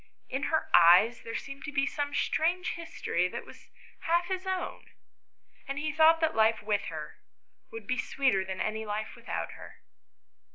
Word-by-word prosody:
In 270 +2 -2
her 315 -1 0
eyes 180 +8 +6
there 230 0 -7
seemed 275 +2 -6
to 290 - -5
be 275 -1 +1
some 285 0 -3
strange 345 +5 +1
history 325 - -2
that - - -7
was - - -15 0.3
half 345 +2 +1
his 375 0 -3
own, 375 -1 -3 0.8
and 275 +1 -4
he 310 +1 -1
thought 320 +2 +5
that 320 0 +2
life 220 0 +3
with 205 -1 0
her - - -7 0.5
would 225 -2 -8
be 255 +3 -1
sweeter 260 -6 +1
than 190 0 -6
any 220 +1 -2
life 215 0 -4
without - - -5
her. - - -13
275 Hz, 170 wpm, -29 LUFS, 215-320 Hz, 0.8 s, eyes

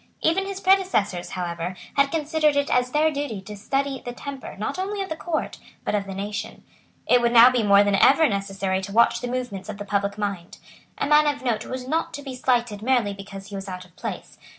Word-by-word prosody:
Even 385 +5 +2
his 395 -1 -5
predecessors, 370 - +2
however, 175 0 -4 0.2
had 280 0 +4
considered 310 -1 +1
it 285 0 +1
as 250 0 +2
their 305 +4 +2
duty 280 -8 -3
to 210 +2 -9
study 270 +6 -2
the 245 - -5
temper, 275 +1 -8
not 215 - -3
only 400 +2 -3
of 385 - -8
the 315 - -3
Court, 320 0 -3 0.3
but - - -1
of 205 -1 0
the 195 - -6
nation. 210 +3 -5 0.4
It 245 0 +4
would 235 0 +2
now 240 +1 +8
be 250 -2 +1
more 200 -1 +6
than 205 0 +1
ever 295 +10 +5
necessary 195 -2 -2
to 195 +1 -7
watch 235 +3 +4
the 245 - -3
movements 245 -6 -4
of 210 - -5
the 205 - -6
public 200 0 -1
mind. 200 -5 -4 0.4
A - - -1
man 300 +1 +5
of 285 -2 -1
note 225 -3 -1
was 255 0 -5
not 320 +4 -1
to 285 - -8
be 270 -2 -6
slighted 240 -4 0
merely 235 -4 +1
because 195 0 -10
he 200 - -7
was 195 0 -6
out 180 0 -7
of 180 - -23
place. - - -7
235 Hz, 225 wpm, -24 LUFS, 200-285 Hz, 0.4 s, now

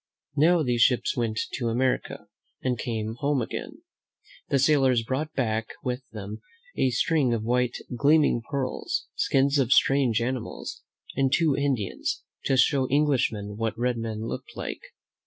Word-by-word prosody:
Now 160 +3 +4
these 120 -3 +1
ships 125 +1 +3
went 115 -3 -1
to 120 - -2
America 125 +3 -1 0.4
and 130 -1 +1
came 110 -1 -3
home 145 -1 +1
again. 115 - -5 0.7
The 140 - +3
sailors 135 -4 +3
brought 140 +6 -2
back 110 -3 -1 0.2
with 125 +1 -2
them 105 0 -7 0.3
a 130 - +2
string 130 0 +2
of 110 - -3
white, 125 +1 +1 0.2
gleaming 145 -1 +4
pearls, 135 -2 -2
skins 140 +1 +2
of 130 -2 +1
strange 135 -5 +4
animals, 120 - -4 0.3
and 135 -1 +2
two 160 -3 +3
Indians, 135 -9 -1 0.2
to 135 - +2
show 130 0 +3
Eng 145 +3 +3
lishmen 105 -6 -1
what 115 0 -2
red 120 0 0
men 110 -1 -4
looked - - -6
like. - - -5
125 Hz, 150 wpm, -26 LUFS, 115-140 Hz, 0.7 s, Now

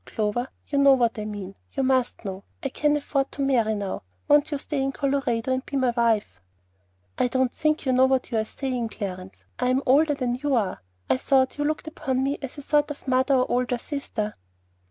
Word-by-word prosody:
Clover, 220 +3 -1 0.2
you 280 - 0
know 280 -1 +7
what 235 -3 +1
I 210 - -3
mean; 205 -2 -6 0.2
you 270 - 0
must 255 -3 +1
know. 190 0 -5 0.2
I 275 - 0
can 295 +2 +1
afford 275 -1 -1
to 280 - -2
marry 230 -5 +2
now; 200 -2 -3 0.3
won't 290 0 +5
you 295 - -1
stay 280 0 -3
in 270 0 0
Colorado 270 -4 0
and 260 0 -1
be 280 - -3
my 255 -2 +2
wife?" 220 - +1 0.8
"I - - +4
don't 260 0 +1
think 305 0 0
you 260 - +2
know 260 +1 +5
what 260 0 0
you 225 - +1
are - - +1
saying, 245 0 -3
Clarence. 190 -3 -7
I'm 255 +2 +2
older 290 +3 +4
than 250 -2 -1
you 290 -2 +1
are. 205 - -1 0.3
I 130 - +3
thought 265 - +2
you 290 - +1
looked 310 +1 -2
upon 265 -5 -1
me 280 +2 -1
as 270 +1 -6
a 285 - -7
sort 295 +1 +2
of 290 -1 -8
mother 260 +2 +3
or 255 -1 +1
older 245 0 +1
sister." 240 -6 -4
260 Hz, 215 wpm, -25 LUFS, 230-280 Hz, 0.8 s, know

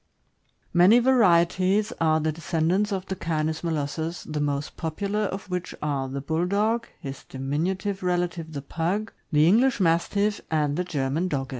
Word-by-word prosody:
Many 180 +7 +7
varieties 200 -4 +3
are 160 -1 +3
the 155 0 0
descendants 170 +5 0
of 190 -1 -2
the 190 - -4
Canis 160 -2 -2
mo 170 - -1
lossus, 160 +2 -3
the 155 -1 -3
most 145 0 -2
popular 200 +6 -2
of 195 -1 -5
which 180 -1 -4
are 140 -3 -2
the 135 +1 -4
Bulldog, 200 - 0
his 135 -1 -7
diminutive 175 +9 -2
relative 175 -3 -1
the 140 -2 -5
Pug, 180 +9 -2 0.2
the 155 0 +5
English 235 +6 +4
Mastiff, 200 +4 +1
and 150 -2 +1
the 180 - 0
German 155 +1 -1
Dogge. 135 -4 -2
170 Hz, 155 wpm, -25 LUFS, 155-195 Hz, 0.2 s, Many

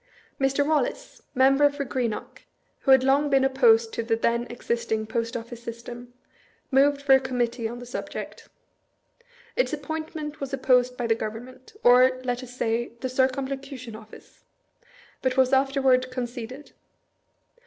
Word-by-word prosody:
Mr. 275 +1 +2
Wallace, 300 -4 -1
member 275 +3 +5
for 285 0 -4
Greenock, 245 -4 -3 0.4
who - - -4
had 265 -1 +7
long 280 +2 +3
been 270 -1 +3
opposed 235 -4 +4
to - - -2
the 225 0 0
then 235 +1 0
existing 235 -2 -2
Post 230 +1 -3
Of&ce 235 0 -7
system, 240 +1 -8 0.6
moved 280 +1 +3
for 275 -1 +5
a 265 - +7
Committee 245 -3 -2
on 235 +2 -7
the 245 - -9
subject. 245 - -7 1.1
Its - - +1
appointment 310 0 -5
was 275 0 -5
opposed 250 -2 +2
by 245 - -2
the 225 -1 +2
Gov 215 -1 -4
ernment 255 - -12
— - - -39
or, 255 +1 +6
let 245 -1 -2
us 250 -1 -11
say, 230 0 -1
the 260 - -2
Circumlocution 265 -1 -2
Office 220 0 -15 0.4
— - - -27
but 260 0 -1
was 260 0 +3
afterward 265 -1 +3
conceded. 255 +2 -6
255 Hz, 155 wpm, -25 LUFS, 235-270 Hz, 1.1 s, had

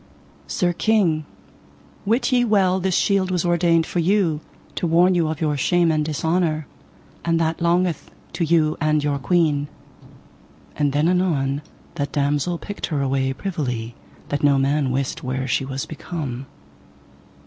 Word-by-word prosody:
Sir 175 - 0
King, 175 -7 +1 0.8
wit 235 +6 +2
ye 245 -1 +4
well 195 -5 +3
this 185 -1 0
shield 195 -2 +2
was 180 -2 0
ordained 170 -1 +3
for 175 - -2
you, 170 -3 +2 0.3
to 175 - -2
warn 175 +3 +4
you 170 -3 +2
of 155 0 -3
your 150 -2 +1
shame 170 +4 +2
and 155 -1 +1
dishonour, 160 +1 0 0.6
and 165 -1 +1
that 165 0 -1
longeth 170 -1 +1 0.2
to 170 - -1
you 160 -1 +2
and 155 -1 +2
your 145 -1 0
queen. 150 -3 +1 1.1
And 145 -2 +1
then 145 +3 +2
anon 155 -7 +1 0.4
that 145 - -3
damosel 145 +4 0
picked 205 +4 -5
her 145 -4 -1
away 135 0 0
privily, 130 - -3 0.4
that 145 - -1
no 140 -1 +5
man 140 +1 +1
wist 135 +1 -2
where 130 0 -3
she 135 +1 0
was 135 0 -4
become. 145 -5 -6
160 Hz, 150 wpm, -22 LUFS, 145-175 Hz, 1.1 s, no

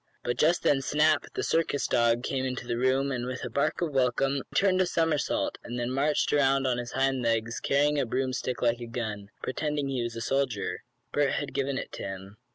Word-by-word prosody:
But 120 - -2
just 170 +3 +3
then 140 -2 +3
Snap, 150 +3 +2
the - - -1
circus 160 -4 +1
dog, 120 0 +2
came 130 0 -1
in 130 -1 -2
the 120 -2 -3
room, 130 +3 +1
and, 125 -2 -2
with 130 0 -4
a - - -5
bark 140 +5 0
of 165 - -1
welcome, 135 +1 +2
he - - -2
turned 190 -2 +4
a 185 - +2
somersault, 165 -4 0
and 120 +1 -5
then 120 +1 -2
marched 145 +3 +1
around 135 -1 +3
on 125 -2 +1
his 120 0 -6
hind 135 -1 +1
legs, 115 0 0
carrying 145 +1 +2
a - - +1
broomstick 130 0 -2
like 120 0 +2
a 120 - -5
gun 110 -4 -4
pretending 145 +1 -2
he 130 -2 -1
was 120 -1 -3
a 115 - -4
soldier. 130 -4 -1 0.3
Bert 145 -2 +2
had 145 - -3
given 140 -1 -1
it - - -5
to - - -7
him. 95 +1 -7
130 Hz, 220 wpm, -28 LUFS, 120-140 Hz, 0.3 s, turned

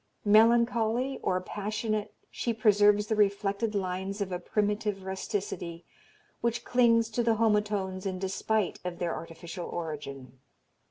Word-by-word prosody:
Melancholy 235 +3 +4
or 185 - +1
passionate 210 +2 -3 0.2
she 235 -2 -2
preserves 210 -1 +4
the 220 - 0
reflected 205 +1 +1
lines 190 +1 -2
of 200 -2 -2
a 180 - -2
primitive 205 +1 -1
rusticity, 190 -3 -4 0.6
which 235 0 -1
clings 230 -2 +4
to 240 - 0
the 230 -1 +2
homotones 210 -4 0
in 185 -1 -3
despite 195 +2 -1
of 180 -1 -4
their 170 -2 -1
artificial 165 +2 -7
origin." 140 -6 -6
205 Hz, 125 wpm, -29 LUFS, 185-220 Hz, 0.6 s, Melancholy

